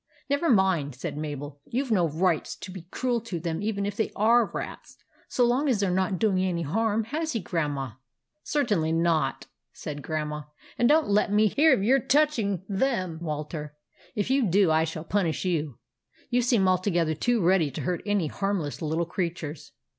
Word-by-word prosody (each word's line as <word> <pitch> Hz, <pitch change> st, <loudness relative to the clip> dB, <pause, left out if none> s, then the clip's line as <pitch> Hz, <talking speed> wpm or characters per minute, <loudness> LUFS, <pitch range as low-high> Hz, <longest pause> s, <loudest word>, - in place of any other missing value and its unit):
" -, -, -33 dB
Never 285 Hz, +4 st, +2 dB
mind," 190 Hz, -, +2 dB
said 130 Hz, -, -5 dB
Mabel; 145 Hz, -1 st, -6 dB
" -, -, -47 dB
you 260 Hz, +4 st, -1 dB
Ve 240 Hz, -, 0 dB
no 175 Hz, -5 st, +3 dB
right 170 Hz, +2 st, +1 dB
\S -, -, -6 dB
be 185 Hz, -3 st, -9 dB
cruel 245 Hz, 0 st, -1 dB
to 200 Hz, -7 st, -5 dB
them 165 Hz, +1 st, -3 dB
even 205 Hz, -1 st, -1 dB
if 205 Hz, 0 st, -3 dB
they 220 Hz, -, -1 dB
are 230 Hz, +2 st, +4 dB
rats, -, -, -7 dB, 0.3 s
so 245 Hz, -, +2 dB
long 260 Hz, +5 st, +2 dB
as 235 Hz, -6 st, +2 dB
they 200 Hz, -, +2 dB
're -, -, 0 dB
not 190 Hz, +1 st, 0 dB
doing 190 Hz, -2 st, +2 dB
any 175 Hz, -3 st, -1 dB
harm, 220 Hz, +7 st, 0 dB
has 315 Hz, +8 st, -3 dB
he, 230 Hz, -, 0 dB
Grandma? 145 Hz, -, -2 dB, 0.2 s
" 130 Hz, -, -58 dB
" 305 Hz, -, -52 dB
Certainly 205 Hz, -, +1 dB
not," 165 Hz, -4 st, +1 dB, 0.3 s
said 145 Hz, -2 st, -6 dB
Grandma; 150 Hz, -1 st, -3 dB, 0.2 s
" -, -, -23 dB
and 240 Hz, -, +4 dB
don't 310 Hz, +1 st, +4 dB
let 205 Hz, 0 st, +2 dB
me 210 Hz, +1 st, +4 dB
hear 295 Hz, -, +4 dB
of 195 Hz, -, +3 dB
your 260 Hz, +6 st, +4 dB
touching 240 Hz, -, +1 dB
them, 190 Hz, -6 st, -1 dB
Walter. 150 Hz, -1 st, -5 dB, 0.4 s
If 210 Hz, +4 st, -1 dB
you 265 Hz, -4 st, +3 dB
do, 190 Hz, -1 st, +4 dB
I 160 Hz, +1 st, +3 dB
shall 155 Hz, 0 st, -5 dB
punish 180 Hz, -2 st, -1 dB
you. 155 Hz, -8 st, -1 dB, 0.5 s
You 245 Hz, +1 st, +3 dB
seem 230 Hz, -6 st, +3 dB
altogether 180 Hz, -3 st, +2 dB
too 240 Hz, +9 st, +1 dB
ready 175 Hz, -4 st, +3 dB
to 135 Hz, -, -6 dB
hurt 180 Hz, -1 st, -2 dB
any 205 Hz, -4 st, +1 dB
harmless 185 Hz, -2 st, -2 dB
little 160 Hz, +2 st, 0 dB
creatures." 170 Hz, -3 st, -4 dB
185 Hz, 200 wpm, -27 LUFS, 160-225 Hz, 0.5 s, are